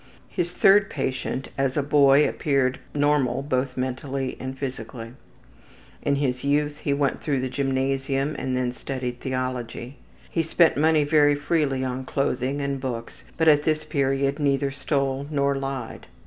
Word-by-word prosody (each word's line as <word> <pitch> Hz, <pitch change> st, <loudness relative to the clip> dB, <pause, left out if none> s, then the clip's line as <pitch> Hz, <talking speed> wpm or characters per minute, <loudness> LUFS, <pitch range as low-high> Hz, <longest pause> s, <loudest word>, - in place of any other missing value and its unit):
His 175 Hz, -2 st, -2 dB
third 195 Hz, +2 st, +5 dB
patient 130 Hz, -1 st, -3 dB
as 135 Hz, 0 st, 0 dB
a 145 Hz, -, +2 dB
boy 145 Hz, 0 st, +5 dB
appeared 135 Hz, -3 st, 0 dB, 0.2 s
normal 145 Hz, -2 st, +2 dB
both 130 Hz, -2 st, -1 dB
mentally 130 Hz, +1 st, -3 dB
and 130 Hz, +1 st, -5 dB
physically. 115 Hz, -3 st, -6 dB, 0.9 s
In 140 Hz, -, +1 dB
his 130 Hz, -3 st, -1 dB
youth 145 Hz, +1 st, +1 dB
he 145 Hz, -, -2 dB
went 140 Hz, -1 st, 0 dB
through 140 Hz, -4 st, 0 dB
the 130 Hz, 0 st, -2 dB
gymnasium 135 Hz, +1 st, -1 dB
and 130 Hz, -1 st, -1 dB
then 125 Hz, -1 st, 0 dB
studied 125 Hz, -1 st, -5 dB
theology. 130 Hz, 0 st, -4 dB, 0.3 s
He 165 Hz, -, +1 dB
spent 165 Hz, +1 st, +3 dB
money 155 Hz, +1 st, +3 dB
very 145 Hz, -1 st, +4 dB
freely 145 Hz, -3 st, 0 dB
on 130 Hz, 0 st, -3 dB
clothing 135 Hz, 0 st, -1 dB
and 140 Hz, -1 st, -2 dB
books, 120 Hz, -3 st, -5 dB, 0.2 s
but 160 Hz, -, +2 dB
at 150 Hz, -2 st, +6 dB
this 155 Hz, 0 st, 0 dB
period 140 Hz, -1 st, 0 dB
neither 140 Hz, -1 st, +1 dB
stole 135 Hz, 0 st, -1 dB
nor 140 Hz, -2 st, +1 dB
lied. 135 Hz, -3 st, -5 dB
135 Hz, 150 wpm, -24 LUFS, 130-145 Hz, 0.9 s, at